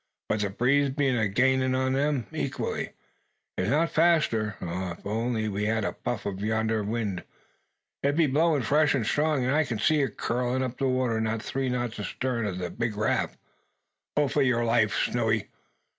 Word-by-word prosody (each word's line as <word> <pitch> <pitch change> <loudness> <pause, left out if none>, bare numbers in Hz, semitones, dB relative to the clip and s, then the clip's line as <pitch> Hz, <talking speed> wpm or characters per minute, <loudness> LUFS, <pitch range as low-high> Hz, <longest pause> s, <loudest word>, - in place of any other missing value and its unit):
But 110 - +1
the 105 -1 0
breeze 135 +7 +2
be 140 0 +1
a 115 -4 +2
gainin' 130 +4 +2
on 130 0 +1
them, 140 -3 +1
equally, - - -3 0.6
if 95 - -1
not 160 +5 +2
faster. 155 - +2
O 90 +1 -3
if - - -22
we 100 - -3
only 110 -3 -1
had 110 -1 0
a - - -2
puff 120 -3 -4
o' 100 - -1
yonder 110 +2 0
wind! 105 -3 -2 0.8
It 140 +1 +1
be 165 0 +4
blowin' 150 0 +2
fresh 150 +5 +3
and 120 -5 0
strong. 145 +1 +1
I 150 +5 +3
can 120 -6 -3
see 150 +8 +3
it 130 -7 -2
curlin' 125 +2 0
up 125 -1 -4
the 135 - +1
water 125 -3 +1
not 110 0 -1
three 135 -1 -2
knots 120 -3 -2
astarn 115 +1 -2
o' 100 - -2
the 90 -1 -4
big 115 -3 -2
raft. 110 +1 0 0.8
Pull 150 -1 +3
for 145 - +1
your 125 -3 +2
life, 115 -2 +2
Snowy. 110 -3 0
120 Hz, 185 wpm, -27 LUFS, 110-135 Hz, 0.8 s, be